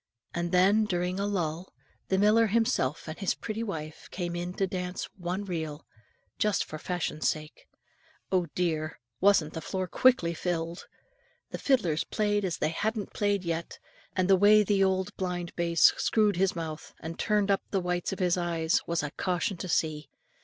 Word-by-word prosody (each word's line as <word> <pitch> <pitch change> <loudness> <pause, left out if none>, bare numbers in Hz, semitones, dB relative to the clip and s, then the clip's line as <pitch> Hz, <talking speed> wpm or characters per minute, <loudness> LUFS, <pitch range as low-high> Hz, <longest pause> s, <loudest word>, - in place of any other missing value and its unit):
And 170 0 -2
when, 195 +4 +4
during 180 -1 -1
a 200 - 0
lull, 175 -3 -2 0.4
the 190 - +1
miller 215 +3 +5
himself 205 - +1
and 155 - -6
his 195 - 0
pretty 220 0 -4
wife 160 -8 -5
came 175 -2 -4
in 175 +1 -4
to 195 - +1
dance 180 -1 -4
one 185 +2 -3
reel, 160 -5 -4 0.5
just 210 -2 +2
for 155 - -7
fashion 175 -3 -3
sake, 155 -1 -2 0.6
oh, 180 -2 +2
dear! 160 -3 -1 0.2
wasn't 190 -6 +4
the 160 - -5
floor 185 +2 -2
quickly 185 -3 +3
filled? 170 0 -3 0.6
The - - -4
fiddlers 185 - +2
played 205 -1 0
as 180 -3 -1
they - - 0
hadn't 210 +5 -2
played 205 -2 +1
yet; 165 -1 -3 0.4
and 185 -1 +2
the 195 - +6
way 210 +2 +6
the 200 -1 +2
old 190 -1 0
blind 180 -2 -3
bass 170 -1 +5
screwed 215 -2 +2
his 190 0 +2
mouth, 160 -2 -6
and 165 +1 -7
turned 210 -2 +2
up 195 - +2
the 195 - +1
whites 180 -1 -1
of 195 - -4
his 180 -1 +2
eyes 165 -2 +1
was 170 -2 0
a 150 - -3
caution 180 +3 -1
to 185 - -5
see. 155 -2 0
180 Hz, 175 wpm, -29 LUFS, 165-200 Hz, 0.6 s, the